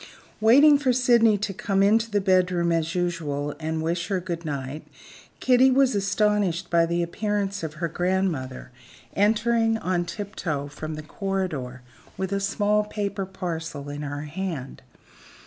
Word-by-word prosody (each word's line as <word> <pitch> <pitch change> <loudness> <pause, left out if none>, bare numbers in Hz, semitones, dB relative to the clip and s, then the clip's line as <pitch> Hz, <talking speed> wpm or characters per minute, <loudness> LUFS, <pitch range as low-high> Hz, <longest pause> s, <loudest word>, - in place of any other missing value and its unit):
Waiting 280 +7 +6
for 270 -3 +2
Sydney 235 -4 +4
to 200 0 -3
come 195 0 0
into 225 +3 +3
the 205 -1 +1
bedroom 180 -3 +2
as 165 0 0
usual 150 -5 -2
and 160 0 -2
wish 170 +1 -1
her 195 -2 0
good 170 -2 -5
night, 140 0 -5 0.5
Kitty 255 +1 +5
was 265 0 +3
astonished 200 -3 0
by 170 -1 +4
the 170 +1 0
appearance 200 +2 -2
of 160 -1 -5
her 170 +2 -2
grandmother, 165 -8 -2 0.4
entering 225 +2 +2
on 180 -4 -1
tiptoe 170 -8 -4
from 155 +2 -6
the 155 - -7
corridor, 155 -9 -4 0.3
with 190 +1 -2
a 200 - +1
small 205 +1 +1
paper 200 -2 -3
parcel 165 -6 -5
in 145 +1 -5
her 145 0 -4
hand. 155 -3 -5
185 Hz, 145 wpm, -25 LUFS, 160-210 Hz, 0.5 s, Waiting